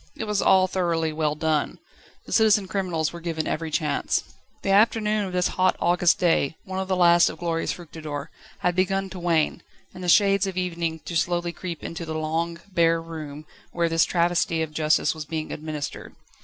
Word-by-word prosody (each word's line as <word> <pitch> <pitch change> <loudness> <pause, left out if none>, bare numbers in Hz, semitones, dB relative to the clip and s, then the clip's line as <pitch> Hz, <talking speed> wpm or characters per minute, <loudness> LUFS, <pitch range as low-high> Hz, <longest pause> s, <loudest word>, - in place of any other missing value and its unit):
It - - -5
was 210 -2 0
all 190 -1 +5
thoroughly 170 -4 -1
well 155 -1 0
done. 155 -1 0 0.5
The - - -11
citizen 215 -3 +4
criminals 180 -5 -1
were 170 - -7
given 165 -2 -3
every 160 0 -2
chance. 150 -2 0 0.4
The 195 - 0
afternoon 210 0 +3
of - - -6
this 180 0 +1
hot 185 0 +2
August 175 0 +3
day, 165 -3 +1
one 190 0 -4
of 190 - -3
the 190 - +1
last 175 -1 +5
of - - -8
glorious 165 -1 -1
Fructidor, 155 -3 -7 0.3
had 180 -1 +1
begun 195 +1 0
to 185 - -7
wane, 165 -3 +1 0.3
and 185 0 -9
the 180 - -1
shades 195 +1 +4
of 190 -1 -5
evening 170 -3 -2
to 170 - -5
slowly 175 +1 0
creep 175 -3 -6
into 170 +1 -5
the 160 -1 -5
long, 165 +2 -2
bare 165 -1 +3
room 155 -2 -8 0.3
where 170 -1 +1
this 165 0 +3
travesty 170 -2 +1
of 155 -1 -6
justice 155 +3 +2
was 155 -2 -7
being 155 0 -4
administered. 150 -1 -6
170 Hz, 190 wpm, -24 LUFS, 160-185 Hz, 0.5 s, all